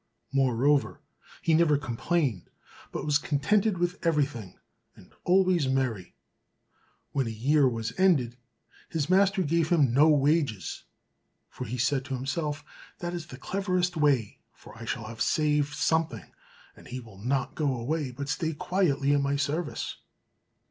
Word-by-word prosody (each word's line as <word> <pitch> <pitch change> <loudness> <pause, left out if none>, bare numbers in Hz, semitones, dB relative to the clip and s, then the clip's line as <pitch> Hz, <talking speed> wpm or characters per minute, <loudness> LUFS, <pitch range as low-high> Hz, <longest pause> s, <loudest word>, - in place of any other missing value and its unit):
Moreover, 135 +2 +2 0.4
he 165 - +2
never 155 -2 +4
complained, 135 - -1 0.4
but - - -4
was 145 -1 +3
contented 190 +9 +1
with 175 +2 -2
everything, 140 - -1 0.4
and - - -18
always 180 -5 +3
merry. 125 -9 -1 1.0
When 135 -4 0
a - - -2
year 135 +5 +3
was 115 -2 -4
ended, 145 -11 +3 0.5
his 160 +1 -2
master 195 0 +4
gave 165 0 +1
him 145 -9 +3
no 150 +5 +6
wages, 145 - +1 0.7
for 125 - -6
he 125 +3 -4
said 130 +2 +1
to 135 - -3
himself, 145 +3 -3 0.3
"That 175 0 -4
is 170 -3 -5
the 125 - -10
cleverest 180 +2 -1
way; 140 -9 +1
for - - -15
I 115 +1 -9
shall 115 0 -4
save 150 0 +1
something, 160 - 0 0.4
and - - -15
he 125 - -5
will 110 -6 -13
not 130 +4 -1
go 145 -4 0
away, 145 +4 -2
but 140 +3 -6
stay 160 +2 -1
quietly 145 -4 +1
in 145 - +3
my 140 0 0
service." 145 +3 -2
145 Hz, 145 wpm, -28 LUFS, 125-165 Hz, 1.0 s, no